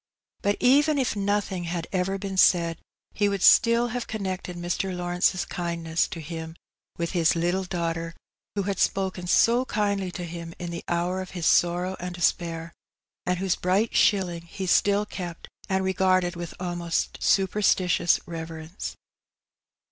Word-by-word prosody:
But 205 0 +1
even 290 +4 +4
if 260 -5 0
nothing 200 -3 -1
had 170 -1 -3
ever 190 +1 0
been 195 0 -5
said, 170 -3 +4 0.3
he 205 -1 +2
would 200 -2 -2
still 235 +1 +6
have 245 0 -4
con 220 -1 -4
nected 185 -2 -4
Mr. 175 +2 -2
Lawrence's 180 +1 +1
kindness 170 -2 -1
to 170 - -7
him 160 +1 -7 0.4
with 170 -1 -2
his 170 -3 +2
little 175 +3 0
daughter, 165 -2 -3 0.4
who 200 - 0
had 195 -1 -2
spoken 190 -2 0
so 235 +7 +4
kindly 200 -5 -1
to 175 - -5
him 170 0 -7
in 175 -1 -5
the 170 - -5
hour 175 +2 0
of 185 - -7
his 170 - -2
sorrow 175 +3 +3
and 180 0 -5
despair, 170 -1 -1 0.5
and 180 0 +1
whose 190 0 0
bright 195 +5 0
shilling 180 -5 +2
he 190 +3 -5
still 200 +3 +3
kept, 175 -5 -7 0.2
and 190 0 +1
regarded 185 -1 +2
with 170 -1 -6
almost 175 -2 -2
superstitious 185 -3 +3
reverence. 165 +1 -6
180 Hz, 155 wpm, -26 LUFS, 170-195 Hz, 0.5 s, still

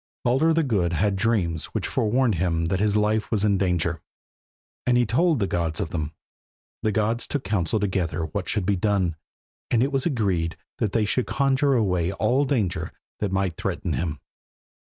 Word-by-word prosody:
Baldur 135 +7 +3
the 165 0 +3
Good 95 - +1
had 100 +5 +1
dreams 95 -7 0
which - - -1
forewarned 120 +2 +1
him 85 -3 +1
that 95 - +1
his 105 0 +2
life 105 +1 +1
was 105 -2 +1
in 100 -2 +2
danger, 85 -3 0 0.9
and 125 -1 +4
he 120 - +3
told 160 - +2
the 105 - +1
gods 85 -4 -1
of 80 - -3
them. 80 -2 -3 0.7
The 110 - +1
gods 110 +3 0
took 145 - -2
counsel 100 0 0
together 90 -5 -1
what 90 +4 -4
should 105 -4 0
be 100 +1 +2
done, 95 -3 +1 0.5
and 120 0 +3
it 140 - 0
was 135 +2 0
agreed 95 - 0 0.2
that 105 -3 0
they 110 -2 +2
should 125 +4 0
conjure 135 0 +2
away 90 -6 +1
all 125 +8 +2
danger 110 -11 -1 0.3
that 105 -2 -1
might 95 -4 0
threaten - - -2
him. 75 -4 -2
105 Hz, 180 wpm, -24 LUFS, 90-120 Hz, 0.9 s, and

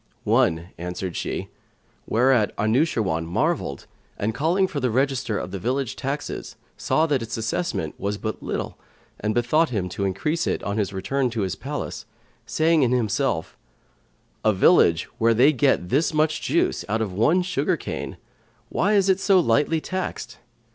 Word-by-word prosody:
"One," 80 +2 +2
answered 90 +1 -4
she; - - -3 0.6
whereat 120 -2 +3
Anushirwan 110 - +1
marvelled 70 -4 -1 0.3
and, 110 +2 -1
calling 170 - +2
for 170 -6 -3
the 130 -2 0
register 130 -2 0
of 90 - -5
the 100 - -4
village 130 +4 -1
taxes, 140 +2 -4 0.2
saw 160 - +1
that 145 -5 +1
its 115 +2 -4
assessment 110 - -2
was 100 +1 -2
but 110 +1 -4
little - - -4 0.4
and 105 +1 -1
bethought 150 +7 +2
him 100 -7 -2
to 100 +2 -3
increase 150 - -1
it, - - -1
on 100 +2 -2
his 100 -2 -1
return 125 +8 -1
to 115 -2 -3
his 95 -2 -1
palace, - - -5 0.4
saying 160 0 +3
in 125 -3 +3
himself, 115 -5 0 0.9
"A 110 - +4
village 95 - +5 0.2
where 115 0 +4
they 135 +7 +5
get 135 -10 +2
this 155 +4 +1
much 155 0 +1
juice - - +1
out 110 +1 +1
of 100 -4 -5
one 155 - +3
sugar 175 -6 0
cane, - - -5 0.5
why 205 +3 +1
is 200 -2 +4
it 190 -1 +3
so 195 -1 +4
lightly 150 +2 +2
taxed?" 185 +4 -5
120 Hz, 160 wpm, -24 LUFS, 100-155 Hz, 0.9 s, village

